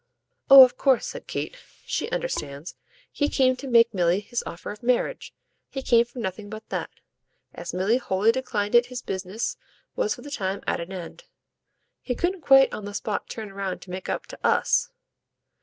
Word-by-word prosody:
"Oh 275 -1 +12
of 255 - +2
course," 265 -3 +3
said - - -7
Kate, - - -4 0.3
"she - - -2
understands. 150 - -4 0.4
He 290 -1 0
came 255 -2 +3
to 275 - -7
make 230 -2 +5
Milly 175 0 +2
his 235 +4 -4
offer 170 - -7
of 210 - -10
marriage 250 - 0 0.4
he 270 - -5
came 235 -2 +4
for 240 +2 -18
nothing 205 -2 -5
but 215 +1 -9
that. - - -3 0.6
As 170 0 -6
Milly 190 +7 +1
wholly 210 -3 +2
declined 220 -5 -2
it 240 0 +5
his 250 0 -7
business 190 +4 -4 0.4
was - - 0
for - - -13
the 290 - -9
time 195 -6 -3
at - - -1
an 170 +3 -7
end. 190 - -8 0.8
He 250 - -3
couldn't 355 +6 -1
quite 270 -2 +6
on 210 - -6
the 205 0 -7
spot 215 -1 -3
turn 215 -3 -7
round 195 -2 -4
to 180 - -12
make 185 +1 -6
up - - -2
to - - -11
US." 485 - +2
230 Hz, 190 wpm, -25 LUFS, 190-260 Hz, 0.8 s, Oh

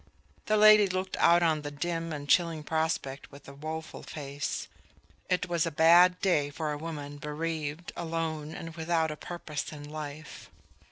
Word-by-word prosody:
The 215 - +3
lady 215 -1 +8
looked 185 0 -2
out 170 +1 +5
on 160 -2 +2
the 145 - -5
dim 165 +3 -3
and 145 -2 -5
chilling 165 0 +2
prospect 160 -4 -2
with 140 0 -14
a 140 - -9
woeful 155 +2 -6
face. 140 -1 -5 0.6
It 180 0 +1
was 170 -2 0
a - - -2
bad 175 +4 +6
day 155 -7 +2
for 150 +1 -3
a 150 - -3
woman 145 -3 -6
bereaved, 155 +1 -4
alone 160 -2 -3
and 165 0 -7
without 160 -1 0
a - - -4
purpose 155 -2 -5
in 145 -1 -9
life. 150 0 -8
160 Hz, 165 wpm, -29 LUFS, 150-170 Hz, 0.6 s, lady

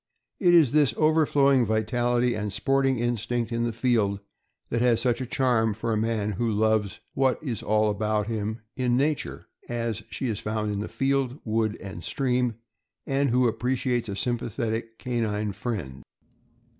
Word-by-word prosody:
It 175 -2 +5
is 155 -8 +6
this 145 -6 +3
over 155 0 +3
flowing 140 -3 +4
vitality 120 +3 +1
and 105 -2 -3
sporting 135 +5 +1
instinct 120 0 -1
in 115 0 0
the 120 - -1
field 110 -4 +1 0.5
that 115 - 0
has 120 -2 +4
such 120 -1 +1
a 130 - -3
charm 115 -5 +1
for 115 +1 -2
a - - +1
man 110 -1 0
who 115 +3 -1
loves 110 -1 +1
what 135 -1 +2
is 125 -8 -3
all 110 0 +2
about 105 0 0
him 110 0 -3
in 125 -2 +1
nature 145 +2 -1 0.2
as 115 -2 -2
she - - -4
is 110 -4 -1
found 105 0 -2
in 100 +1 -3
field, 135 0 0
wood, 110 -1 0
and 95 -3 -8
stream, 125 - 0 0.5
and 135 0 +1
who 125 +1 +3
appreciates 120 0 -1
a 100 - -3
sympathetic 115 0 -2
canine 110 -4 -1
friend. 95 - -5
115 Hz, 160 wpm, -26 LUFS, 110-125 Hz, 0.5 s, is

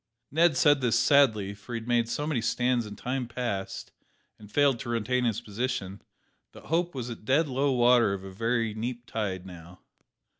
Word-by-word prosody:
Ned 165 +3 +3
said 145 -2 +4
this 120 -2 +2
sadly, 110 -9 +3
for 105 +4 -8
he - - -1
had 115 - -12
made 120 -1 +1
so 145 +5 -2
many 150 -6 -1
stands 125 0 0
in 105 - -8
time 125 +3 -3
past, 115 -5 -4 0.5
and 105 -1 -14
failed 140 -4 +3
to 130 -3 -6
retain 125 +2 0
his 115 -4 0
position, 105 -3 -4 0.5
that - - -13
hope 170 +1 0
was 125 -2 -4
at 115 - -9
dead 140 +8 +2
low 135 +1 0
water 120 -3 +4
of 95 - -9
a 95 - -8
very 115 +2 -1
neap 120 +2 -5
tide 95 -6 -3
now. 90 0 -12
120 Hz, 190 wpm, -28 LUFS, 105-130 Hz, 0.5 s, said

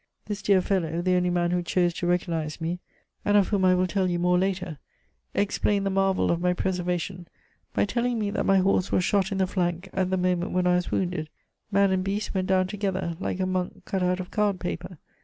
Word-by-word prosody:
This 210 -1 -4
dear 195 -2 +4
fellow, 170 -4 0
the 185 0 +2
only 180 0 +2
man 175 -1 +1
who 180 0 +1
chose 175 0 +1
to 175 - -3
recognize 170 -3 -1
me, 170 +2 -2 0.4
and 205 0 +3
of 200 - +3
whom 200 -3 +1
I 185 0 +5
will 180 0 +2
tell 185 0 0
you 175 - 0
more 180 +1 +2
later, 180 -5 -2 0.6
explained 200 0 +1
the 195 - +1
marvel 195 0 +2
of 170 0 0
my 180 0 +2
preservation, 180 -1 -2 0.5
by - - +3
telling 240 +2 0
me 210 -2 -1
that - - -1
my 195 - +5
horse 190 0 +2
was 185 - +2
shot 200 +1 +1
in 195 - -1
the 190 - +3
flank 180 0 -2
at 190 -1 0
the 190 - +1
moment 180 -1 0
when 180 0 +1
I 180 - +4
was 180 0 0
wounded. 175 -4 -1 0.4
Man 200 -1 +4
and 185 0 +1
beast 200 +2 -2
went 185 -1 -1
down 185 -1 +3
together, 190 -3 -2
like 190 - -3
a 185 - +1
monk 185 -1 -3
cut 195 -3 -2
out 180 0 +1
of 180 - -6
card 205 -3 +1
paper. 85 - -5
185 Hz, 230 wpm, -26 LUFS, 180-195 Hz, 0.6 s, I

